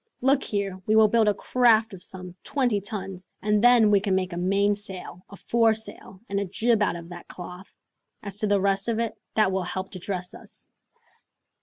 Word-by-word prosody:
Look 270 +2 +3
here, 195 -2 -3
we 215 - +3
will 220 -1 +6
build 225 0 +3
a 210 - +4
craft 225 -2 +3
of 185 - -10
some 180 -2 -9
twenty 245 -8 0
tons, 195 -3 -7
and 210 +1 +1
then 240 -3 +6
we 200 - +5
can 195 -1 0
make 185 -1 -1
a - - -4
main 195 +3 +2
sail, 190 -3 -9
a 200 - -11
foresail, 220 -4 -1
and 200 0 -1
a 200 - -1
jib 225 +4 +1
out 205 - +1
of 170 0 -9
that 175 -1 -10
cloth. 180 +2 -10 0.5
As 200 -1 -6
to 215 - 0
the 205 -1 +3
rest 195 +1 +1
of 230 -2 0
it, 230 -1 -1 0.2
that 215 -3 +3
will 190 0 0
help 190 +1 -5
to 185 - -8
dress 180 -1 -4
us." - - -12
200 Hz, 205 wpm, -25 LUFS, 185-220 Hz, 0.5 s, will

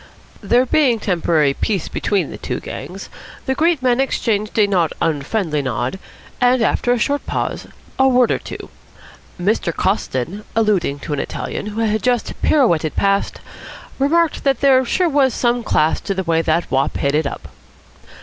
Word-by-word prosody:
There 240 +5 +3
being 260 -3 +3
temporary 165 -8 +1
peace 195 +2 -2
between 190 -7 -1
the - - -7
two - - -4
gangs, 180 +8 -8 0.4
the 265 - +1
great 320 -1 +1
men 250 -1 +2
exchanged 215 -6 -1
a 215 - +5
not 180 -5 +1
unfriendly 155 +1 -1
nod 125 - -3 0.4
and, 250 -1 +4
after 245 - +1
a 245 - +3
short 285 +5 0
pause, - - -3 0.3
a 265 - +5
word 250 -2 +4
or - - 0
two. - - -9 0.7
Mr. 185 -1 0
Coston, 185 - -2
alluding 205 -10 +1
to 150 - -4
an 145 - -2
Italian 210 - -4
who 215 +2 -3
had 215 -1 0
just 245 -2 0
pirouetted 170 - +2
past, 200 0 0 0.6
remarked 320 +4 +2
that 270 -3 +1
there 265 -2 +5
sure 360 +8 +1
was 275 -6 +2
some 240 0 +1
class 155 -6 +1
to 195 - -3
the 190 - -2
way 165 -2 +1
that 165 -1 0
wop 135 +1 +1
hit 140 0 0
it 150 -1 +1
up. 80 - -8
210 Hz, 170 wpm, -19 LUFS, 165-250 Hz, 0.7 s, a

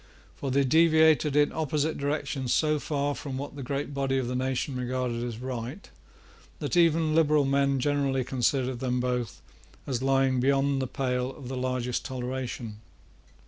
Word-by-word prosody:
For 140 - -4
they 140 +2 +3
deviated 160 0 +4
in 145 0 +4
opposite 155 0 -1
directions 140 -2 -2
so 155 -1 +2
far 145 -1 -1
from 135 -2 -6
what 140 +1 -6
the 140 - -6
great 140 +2 -3
body 135 -1 0
of 130 -2 -1
the 125 - -3
nation 130 +1 -1
regarded 125 -1 -2
as 120 -2 -4
right, 125 - -6 0.7
that - - -3
even 165 -2 +3
liberal 155 -2 +4
men 140 0 +2
generally 140 -1 +1
considered 130 0 0
them 125 -1 -1
both 125 -3 -2 0.4
as 130 -3 -2
lying 135 -1 +2
beyond 135 +1 +2
the 130 - -1
pale 125 -1 -1
of 135 -2 -9
the 130 - -4
largest 125 -1 -2
toleration. 125 -4 -5
135 Hz, 160 wpm, -27 LUFS, 125-145 Hz, 0.7 s, deviated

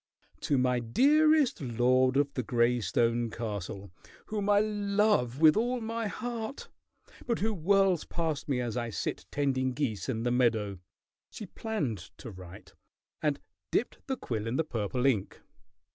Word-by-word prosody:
"To 140 - 0
my 125 -1 +2
dearest 290 - +3
lord 130 +1 +2
of 140 0 +1
the 125 - -1
gray 120 +1 +2
stone 115 +5 +1
castle, 100 -4 -5 0.3
whom 210 -1 -2
I 205 0 +5
love 205 - +1
with 155 -1 +7
all 245 +3 0
my 225 0 -3
heart, 235 +3 -5 0.6
but 235 - +1
who 220 +2 0
whirls 190 -1 +2
past 160 -4 -3
me 130 -3 +1
as 120 -2 -3
I 120 -1 -2
sit 110 - -4
tending 130 -2 0
geese 125 -5 -2
in 115 -3 -2
the 120 - +1
meadow," 110 -6 +1 0.5
she 215 - -8
planned 165 - -3 0.2
to 115 - -8
write, 90 -1 -12 0.5
and 150 -2 0 0.3
dipped - - -1
the 265 -1 -2
quill 110 -2 -4
in 115 - -2
the 160 - +2
purple 125 -2 -2
ink. 115 -8 +1
130 Hz, 155 wpm, -30 LUFS, -, 0.6 s, with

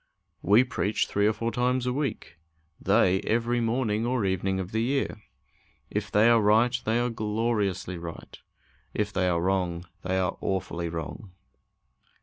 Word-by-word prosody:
We 105 +6 +5
preach 120 -5 -1
three 100 +1 +1
or 110 - +2
four 115 +2 -2
times 125 +2 0
a 125 - 0
week; 135 - -4 0.4
they 95 +1 +3
every 120 +2 0
morning 115 -2 0
or 120 -3 0
evening 95 0 0
of 95 -1 -5
the 110 - 0
year. 125 -3 -1 0.7
If 105 -1 -2
they 105 +2 +5
are 115 -1 +5
right, 110 +4 +4
they 115 +2 +2
are 120 0 0
gloriously 105 -5 -1
right; 85 -1 -9 0.6
if 105 -1 -1
they 90 -1 +1
are 85 -1 +1
wrong, 90 -1 -1 0.2
they 95 0 -1
are 90 -2 -1
awfully 85 -3 -2
wrong. 85 +4 -6
105 Hz, 155 wpm, -27 LUFS, 95-120 Hz, 0.7 s, We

